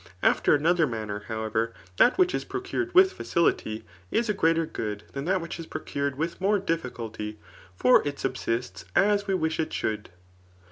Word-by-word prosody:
After - - +4
another 165 +2 +3
manner, 105 -3 -4
luiwevm', 110 +1 -1 0.2
that 245 - +5
which 370 -1 +4
is - - -1
procured 375 -1 -3
with 380 +1 +7
facility 110 -10 0 0.2
[is 235 -1 0
a - - +3
greater 165 -3 +2
HoodJ 105 -7 -5
than 140 +1 -5
that 185 +1 +1
which 170 0 -6
is 165 - -7
procured 140 -1 -3
witib 165 +3 -2
nvore 200 +2 +2
difficulty^ 115 - -3 0.4
ibr 125 0 +6
it 145 -1 -3
subsists 115 -7 -2
as 205 0 +3
we 195 - +2
wish 160 -2 -1
it 160 - -1
should. 105 -1 -2
155 Hz, 170 wpm, -27 LUFS, 115-190 Hz, 0.4 s, with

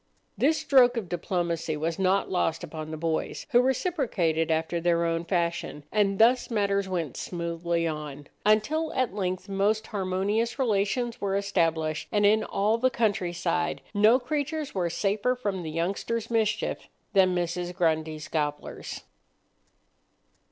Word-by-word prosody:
This 310 +4 +2
stroke 250 -3 +5
of 215 -6 -3
diplomacy 170 -2 -2
was 165 +3 -2
not 190 +1 +2
lost 170 -3 0
upon 155 -1 -6
the 155 - -5
boys, 160 0 -2
who 245 -1 +6
reciprocated 240 - 0
after 160 +1 0
their 170 0 +2
own 165 0 -1
fashion: 170 -4 -1
and 200 -2 +2
thus 240 +4 +4
matters 200 -3 0
went 170 -7 -2
smoothly 170 -1 -2
on, 150 -2 -5 0.2
until 250 +10 +2
at 255 -7 0
length 185 -2 -3
most 205 +3 +1
harmonious 205 +4 -1
relations 235 0 0
were 195 -1 0
established, 165 -6 0
and 205 -1 +3
in 215 +2 +4
all 215 +3 +1
the 255 +2 +3
countryside 175 - 0
no 215 +4 +5
creatures 295 +3 -3
were 180 -3 0
safer 205 +7 0
from 205 -7 -3
the 160 - -5
youngsters' 200 +8 -2
mischief 220 -2 0 0.3
than 185 -2 +4
Mrs. 175 0 -2
Grundy's 155 -2 0
gobblers. 150 -2 -3
190 Hz, 135 wpm, -27 LUFS, 165-220 Hz, 0.3 s, who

